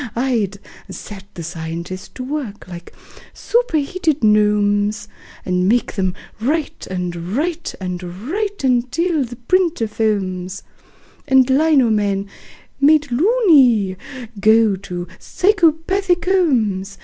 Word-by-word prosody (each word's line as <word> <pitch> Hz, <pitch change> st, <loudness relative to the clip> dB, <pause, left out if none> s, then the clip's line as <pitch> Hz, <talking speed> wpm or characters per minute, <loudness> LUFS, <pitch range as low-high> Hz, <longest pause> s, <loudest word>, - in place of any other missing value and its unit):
I'd 230 Hz, -6 st, 0 dB, 0.3 s
set 195 Hz, -2 st, -9 dB
the 170 Hz, -, -6 dB
scientists 170 Hz, +2 st, -6 dB
to 255 Hz, -, -5 dB
work 255 Hz, -8 st, -5 dB
like 175 Hz, -1 st, -10 dB, 0.4 s
superheated 325 Hz, -, 0 dB
gnomes, 210 Hz, 0 st, +2 dB, 0.4 s
And 180 Hz, +1 st, +1 dB
make 240 Hz, +2 st, +1 dB
them 190 Hz, -2 st, -1 dB, 0.2 s
write 295 Hz, +7 st, -2 dB
and 180 Hz, -2 st, -3 dB, 0.2 s
write 335 Hz, +2 st, -2 dB
and 180 Hz, -1 st, -4 dB
write 295 Hz, -, -4 dB
until 265 Hz, +6 st, +1 dB
the 240 Hz, -1 st, -7 dB
printer 320 Hz, 0 st, +1 dB
foams 195 Hz, -4 st, -2 dB, 0.6 s
And 265 Hz, -1 st, +5 dB
lino 270 Hz, -3 st, +3 dB
men, 200 Hz, -2 st, 0 dB, 0.5 s
made 295 Hz, -1 st, +4 dB
"loony", 270 Hz, -, +4 dB, 0.4 s
go 220 Hz, 0 st, +4 dB
to 180 Hz, -2 st, -6 dB
psychopathic 360 Hz, -1 st, +1 dB
homes. 225 Hz, -, +1 dB
230 Hz, 105 wpm, -19 LUFS, 195-310 Hz, 0.6 s, And